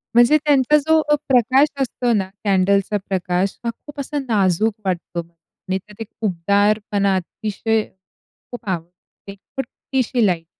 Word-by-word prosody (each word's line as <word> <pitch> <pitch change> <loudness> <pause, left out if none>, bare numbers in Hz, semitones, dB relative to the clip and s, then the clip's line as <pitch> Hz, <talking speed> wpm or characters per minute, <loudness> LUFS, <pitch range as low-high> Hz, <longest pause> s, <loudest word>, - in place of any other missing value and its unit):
म्हणजे 240 +6 +6
त्यांचा 290 -1 +3
जो 315 +2 +3
अ, 295 - +6
प्रकाश 260 +2 +4
असतो 245 -2 0
ना 195 -3 0
कॅन्डल्सचा 200 +1 +2
प्रकाश, 185 0 -1
हा 235 - -1
खूप 290 +5 -13
असा 290 +2 -3
नाजूक 210 -1 +2
वाटतो 175 -1 -2
आणि 170 +3 -7
त्यात 210 +3 -13
एक 225 - -5 0.2
उबदारपणा 200 +2 +1
अतिशय, 215 +4 -1 0.7
खूप 245 -3 -9
आवडते 180 +3 -7
छोटीशी 255 +1 -2
लाईट. 170 -4 0
210 Hz, 130 wpm, -20 LUFS, 190-245 Hz, 0.7 s, म्हणजे